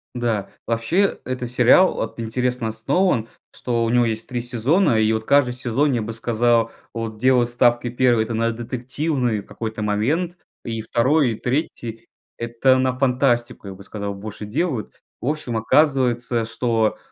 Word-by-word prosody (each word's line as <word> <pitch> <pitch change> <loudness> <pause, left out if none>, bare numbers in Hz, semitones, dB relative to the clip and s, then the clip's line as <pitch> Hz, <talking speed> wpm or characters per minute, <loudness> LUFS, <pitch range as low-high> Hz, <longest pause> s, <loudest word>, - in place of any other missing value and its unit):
Да. 115 -5 -1 0.2
Вообще 160 - +1
этот 125 -2 -4
сериал 125 +9 +5
вот 110 - -5
интересно 125 +1 -1
основан, 115 - 0 0.3
что 115 -2 -1
у - - 0
него 120 0 +3
есть 110 0 -3
3 125 -1 -3
сезона 125 - +2
и 110 0 +3
вот 110 0 -2
каждый 140 -2 +3
сезон, 125 +3 0
я 120 - 0
бы 110 +1 -4
сказал, 115 0 +1 0.2
вот 115 -2 -5
делал 125 +1 +3
ставки. 120 0 +2
1 120 -2 +2
это 115 - -5
на 115 +1 +1
детективный 125 0 -2
какой-то 110 +1 -6
момент 145 - 0 0.3
и 115 -1 -3
2 125 +4 +2
и - - -3
3 120 -4 -3 0.3
это 120 +3 +2
на 130 0 0
фантастику, 125 -5 +1
я 95 - -6
бы 95 +1 -13
сказал, 100 0 -5
больше 105 +1 -7
делают. 130 +1 -2 0.3
В - - -4
общем, 145 -6 -2
оказывается, 120 -2 +2
что, 115 -1 0
120 Hz, 160 wpm, -22 LUFS, 115-130 Hz, 0.3 s, сериал